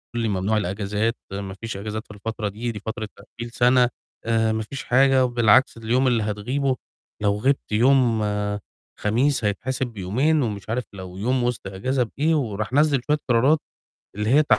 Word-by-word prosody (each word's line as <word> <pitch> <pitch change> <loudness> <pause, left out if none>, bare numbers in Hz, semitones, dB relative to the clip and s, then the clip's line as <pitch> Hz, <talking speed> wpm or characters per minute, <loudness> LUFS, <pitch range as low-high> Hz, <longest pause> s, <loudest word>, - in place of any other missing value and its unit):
لي 115 -1 0
"ممنوع 100 +2 0
الإجازات، 105 +3 -1 0.2
ما 100 -1 -5
فيش 110 0 -6
إجازات 110 +2 -5
في - - -12
الفترة 105 +1 -4
دي، 115 +4 -4
دي 105 - -7
فترة 110 +1 -4
تقفيل 120 0 -9
سَنة، 125 +1 +4 0.4
آآ 115 -1 +2
ما 110 0 -1
فيش 135 +5 -7
حاجة 130 +1 +4
وبالعكس 120 0 +4
اليوم 120 +4 +1
اللي 120 -3 +2
هتغيبه 125 +6 -1 0.5
لو 100 -1 +2
غِبت 135 +1 0
يوم 120 -1 +4 0.8
خميس 120 +3 +1
هيتحسب 125 +5 -1
بيومين،" 120 +9 +1
ومش 105 -2 -4
عارف 120 +2 0
لو 95 -1 -8
يوم 125 +5 0
وِسط 120 -4 -2
إجازة 125 +7 0
بإيه 160 +3 +3
وراح 110 -5 -2
نزّل 145 -2 +3
شوية 150 0 +3
قرارات 130 +6 +4 0.6
اللي 105 +2 -1
هي 150 +3 +5
115 Hz, 165 wpm, -23 LUFS, 105-130 Hz, 0.8 s, هي